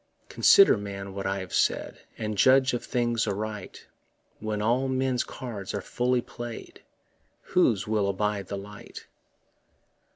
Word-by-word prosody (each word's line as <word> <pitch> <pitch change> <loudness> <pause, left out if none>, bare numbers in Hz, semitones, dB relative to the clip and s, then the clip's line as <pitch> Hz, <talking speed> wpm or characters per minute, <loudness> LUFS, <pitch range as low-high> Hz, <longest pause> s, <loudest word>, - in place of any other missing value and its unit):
Consider, 395 -1 +6
man, 100 -1 -6
what 95 0 -4
I 95 0 -1
have 95 - -9
said, - - 0 0.2
And 110 -1 -3
judge 130 +5 +5
of 120 - -2
things 120 -2 0
aright; 105 +1 -5 0.5
When 110 -1 -3
all 120 +5 +1
men's 130 -1 0
cards 105 -7 -6
are - - -1
fully 125 +5 0
play'd, 120 -1 -9 0.6
Whose 110 - +2
will 105 -2 +1
abide 100 0 -1
the 100 - -4
light? 100 +1 -10
110 Hz, 135 wpm, -27 LUFS, 100-125 Hz, 0.6 s, Consider